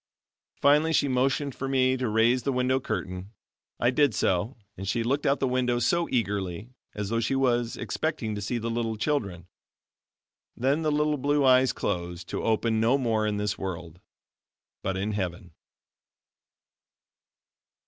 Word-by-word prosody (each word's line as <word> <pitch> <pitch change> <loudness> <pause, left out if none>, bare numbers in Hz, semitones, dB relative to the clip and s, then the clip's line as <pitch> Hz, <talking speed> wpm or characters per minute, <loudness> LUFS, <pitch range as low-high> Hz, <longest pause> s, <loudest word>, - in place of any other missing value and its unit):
Finally 150 +3 +4
she 145 - +3
motioned 135 +2 0
for 135 - -5
me 130 -1 +2
to 130 -3 -2
raise 115 +4 +3
the 140 - -1
window 125 +1 +1
curtain. 95 -5 -4 0.5
I 120 - +3
did 140 -4 +2
so 95 +8 0 0.2
and 95 +1 -7
she 115 +4 0
looked 140 +5 0
out 140 +1 +2
the 135 - +1
window 125 -1 +1
so 170 +8 +1
eagerly, 100 -2 -2 0.2
as 105 -1 -3
though 115 +1 0
she 115 +4 0
was 120 -3 +1
expecting 155 -9 -2
to 105 - -4
see 110 +4 -2
the 115 0 -3
little 115 -1 -2
children. 100 - -2 1.1
Then 135 +6 +1
the 155 -1 +1
little 150 0 +1
blue 145 +1 +2
eyes 130 0 +5
closed 85 0 -4
to - - -3
open 110 0 +1
no 115 +5 +3
more 110 -5 0
in 105 -1 -1
this 105 -1 -2
world, 90 -3 -6 0.8
but 95 0 -2
in 100 +3 -1
heaven. 90 -4 -4
120 Hz, 160 wpm, -27 LUFS, 105-135 Hz, 1.1 s, eyes